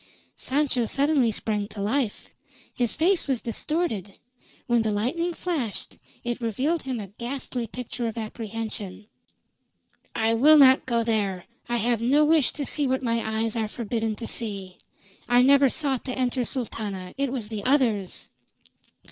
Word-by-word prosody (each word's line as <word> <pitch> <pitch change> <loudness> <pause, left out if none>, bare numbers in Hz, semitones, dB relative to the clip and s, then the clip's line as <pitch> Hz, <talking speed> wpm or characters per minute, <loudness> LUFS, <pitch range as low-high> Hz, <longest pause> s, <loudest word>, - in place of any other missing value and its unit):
Sancho 260 -4 0
suddenly 280 -2 +3
sprang 210 -1 -2
to 210 - -10
life. 220 +2 -1 0.4
His 240 -2 0
face 345 +3 +2
was 265 -4 +1
distorted; 230 - -2 0.5
when 240 -1 +3
the 220 -1 0
lightning 260 +12 0
flashed 315 - -3 0.2
it 240 0 -3
revealed 265 +9 0
him 260 -3 -3
a 205 - -5
ghastly 245 -1 -3
picture 245 0 -4
of 225 - -5
apprehension. 220 -2 -5 1.1
"I 225 +1 +2
will 295 +7 +7
not 265 -2 +6
go 235 -2 +1
there! 205 -5 -1 0.2
I 240 - +1
have 235 0 +1
no 280 +6 +4
wish 310 -3 +4
to 290 - -3
see 290 0 +1
what 260 0 0
my 230 -1 +1 0.2
eyes 225 0 -2
are 220 -2 0
forbidden 225 0 -2
to 230 - -7
see. 200 -6 -4 0.5
I 245 +1 +6
never 275 0 +6
sought 270 -2 0
to 255 -1 -4
enter, 250 -1 0
Sultana. 205 -8 -4
It 275 -2 -1
was 235 -6 -4
the 215 -3 -5
others!" 230 -8 +1
240 Hz, 155 wpm, -25 LUFS, 220-270 Hz, 1.1 s, will